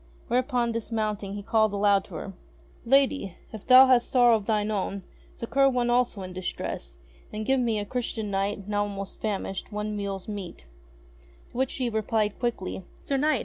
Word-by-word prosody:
Whereupon, 245 -1 +1
dismounting 215 -3 -2
he 205 - -6
called 220 -1 +2
aloud 200 -1 +3
to 180 - -11
her: 195 +5 -6 0.5
"Lady! 270 -6 +2 0.2
If 215 - -9
thou 255 +1 +10
hast 255 -2 +4
sorrow 245 -2 +5
of 210 -3 -3
thine 215 -1 +1
own, 200 -1 -2 0.3
succour 275 +4 +2
one 245 -2 +1
also 240 -5 +1
in 185 0 -7
distress, - - -4 0.3
and 215 0 -4
give 265 +2 +2
me, 230 -3 +1
a 205 - -2
Christian 225 -2 -3
Knight, 195 0 -2
now 205 0 0
almost 200 -1 -5
famished, 195 -2 -3
one 210 0 -3
meal's 200 -2 -4
meat." 200 - -7 0.9
To - - -10
which 260 0 +1
she 255 -2 -2
replied 220 -1 0
quickly: 210 -6 -3 0.2
"Sir 275 - 0
Knight! 295 -1 +2
215 Hz, 175 wpm, -27 LUFS, 200-245 Hz, 0.9 s, thou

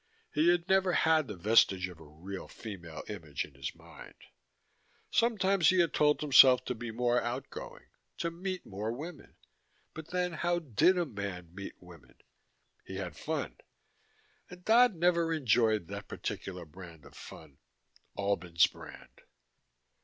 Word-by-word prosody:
He 155 +3 +3
had 175 0 +2
never 190 -2 +3
had 160 -4 +3
the 105 - -6
vestige 95 -2 +3
of 90 -3 -12
a - - -12
real 85 +6 -9
female 85 -8 -9
image 80 -9 -5
in 75 - -18
his 70 0 -6
mind. - - -14 1.0
Sometimes 195 -7 +3
he 185 - +3
had 170 -2 +2
told 150 0 +3
himself 130 -3 +7
to - - -2
be 120 0 -7
more 120 +1 +1
out 120 +3 -4
going, - - -9 0.3
to 170 - -2
meet 185 +2 -5
more 105 +3 -4
women 150 +6 -9 0.6
but, 160 0 -9
then, 180 0 -1
how 175 +2 0
did 170 - +2
a 175 - +1
man 100 - -6
meet 100 +1 -8
women? 85 -8 -16 0.7
He 95 - -9
had 90 -4 -5
fun. - - -4 0.9
And 180 0 -13
Dodd 240 +1 +6
had 170 - -14
never 170 -1 +2
enjoyed 115 - +2
that - - -7
particular 90 -3 -6
brand 85 -1 -13
of - - -15
fun - - -12 0.6
Albin's 90 -4 +2
brand. - - -11
120 Hz, 155 wpm, -31 LUFS, -, 1.0 s, himself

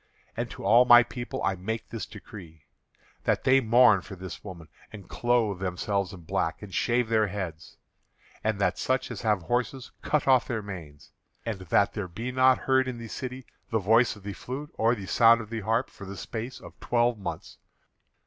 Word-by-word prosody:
And - - -3
to - - -9
all 115 +5 +7
my 120 -1 +8
people 120 +2 -6
I 95 - +2
make 110 +5 -5
this 115 - -5
decree; 85 -7 -12 0.6
that - - +1
they 135 +1 +5
mourn 115 -4 +5
for 95 +1 -10
this 95 0 -8
woman, 85 -5 -9 0.2
and 100 -4 -11
clothe 120 -5 +1
themselves 95 +1 -2
in 95 - -10
black, 80 +3 -2
and 100 -3 -9
shave 120 +6 +1
their 110 -1 +2
heads, 90 -5 -6 0.7
and 110 -1 0
that 90 -2 +1
such 130 -1 0
as 120 - -6
have 105 -5 +1
horses 125 +6 -2
cut 150 -2 0
off 130 -2 +4
their 115 -3 -3
manes, 80 -8 -10 0.3
and 110 -4 -3
that 95 +2 +2
there 100 -3 -4
be 115 +9 -5
not 130 0 +5
heard 130 0 +2
in 125 -2 -4
the 115 -1 -8
city 130 +2 -6 0.2
the 110 - +1
voice 110 +4 +3
of 100 - -15
the 100 0 -5
flute 135 +8 -7
or 115 +2 +2
the 100 -4 -7
sound 115 +3 +5
of 110 -1 -8
the 115 -1 -3
harp 115 +4 0
for 100 - -12
the 100 0 -8
space 115 +6 -6
of - - -14
twelve 120 -1 +1
months." 85 -5 -7
110 Hz, 195 wpm, -27 LUFS, 95-120 Hz, 0.7 s, my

